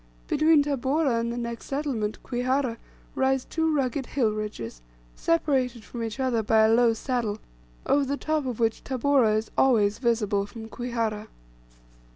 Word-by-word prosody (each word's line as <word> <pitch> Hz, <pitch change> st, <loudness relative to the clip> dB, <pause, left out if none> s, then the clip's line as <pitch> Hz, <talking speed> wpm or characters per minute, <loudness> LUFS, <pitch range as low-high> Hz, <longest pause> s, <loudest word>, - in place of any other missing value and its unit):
Between 310 Hz, 0 st, +4 dB
Tabora 275 Hz, -2 st, +1 dB
and 235 Hz, 0 st, -2 dB
the 240 Hz, -, -4 dB
next 235 Hz, -1 st, -5 dB
settlement, 270 Hz, -7 st, -2 dB
Kwihara, 255 Hz, -1 st, -1 dB, 0.4 s
rise 265 Hz, -1 st, +1 dB
two 320 Hz, 0 st, 0 dB
rugged 270 Hz, -2 st, -1 dB
hill 240 Hz, -6 st, +1 dB
ridges, 210 Hz, -, -5 dB, 0.3 s
separated 260 Hz, -8 st, 0 dB
from 240 Hz, -, -7 dB
each 225 Hz, +2 st, -4 dB
other 255 Hz, -4 st, +1 dB
by 220 Hz, +1 st, +3 dB
a 220 Hz, -, +4 dB
low 235 Hz, 0 st, +4 dB
saddle, 230 Hz, -3 st, -2 dB, 0.5 s
over 285 Hz, -, +3 dB
the 280 Hz, +1 st, -2 dB
top 310 Hz, -3 st, -1 dB
of 245 Hz, -3 st, -4 dB
which 225 Hz, -1 st, 0 dB
Tabora 260 Hz, -4 st, +2 dB
is 220 Hz, -, -4 dB
always 215 Hz, -6 st, +3 dB
visible 210 Hz, -5 st, +1 dB
from 220 Hz, +2 st, -9 dB
Kwihara. 225 Hz, -3 st, -3 dB
240 Hz, 155 wpm, -26 LUFS, 220-270 Hz, 0.5 s, Between